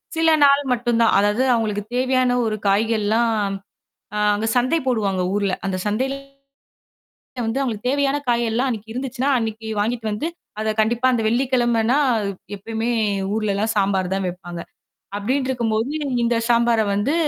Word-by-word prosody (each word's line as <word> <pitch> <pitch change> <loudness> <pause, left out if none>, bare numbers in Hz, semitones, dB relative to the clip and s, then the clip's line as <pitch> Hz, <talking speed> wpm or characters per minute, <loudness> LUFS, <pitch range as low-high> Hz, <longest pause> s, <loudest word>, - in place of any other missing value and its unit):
சில 325 0 +3
நாள் 280 0 +5
மட்டும்தான். 235 -1 +2
அதாவது 205 +5 +2
அவுங்களுக்கு 215 -3 -1
தேவையான 255 0 +2
ஒரு 215 -1 -1
காய்கள் 215 +2 +2
எல்லாம் 230 +3 +2 0.9
அ - - -1 0.2
அங்க 215 +2 -2
சந்தை 255 +7 +2
போடுவாங்க 205 -7 0
ஊர்ல. 200 -2 0
அந்தச் 185 -1 -3
சந்தையில 260 +6 -1 1.3
வந்து 225 +5 -1
அவுங்களுக்கு 240 -3 -2
தேவையான 280 0 +1
காய் 240 0 +2
எல்லாம் 245 +4 0
அன்னக்கி 220 -1 -5
இருந்துச்சுன்னா, 260 +2 -2
அன்னக்கி 225 -1 -4
வாங்கிட்டு 225 +2 -2
வந்து 210 +9 -2 0.3
அதக் 215 0 -2
கண்டிப்பா 235 +3 +1
அந்த 235 -2 +1
வெள்ளிக்கிழமன்னா 240 0 +2 0.6
எப்பயுமே 225 +3 -4 0.5
ஊர்ல 215 -2 0
எல்லாம் 215 +3 -1
சாம்பார்தான் 195 -1 0
வைப்பாங்க. 175 -1 -7 0.6
அப்பிடின்டுருக்கும்போது 240 0 -1 0.3
இந்த 235 0 +2
சாம்பார 235 -1 +3
வந்து 205 +10 0
225 Hz, 135 wpm, -21 LUFS, 210-250 Hz, 1.3 s, நாள்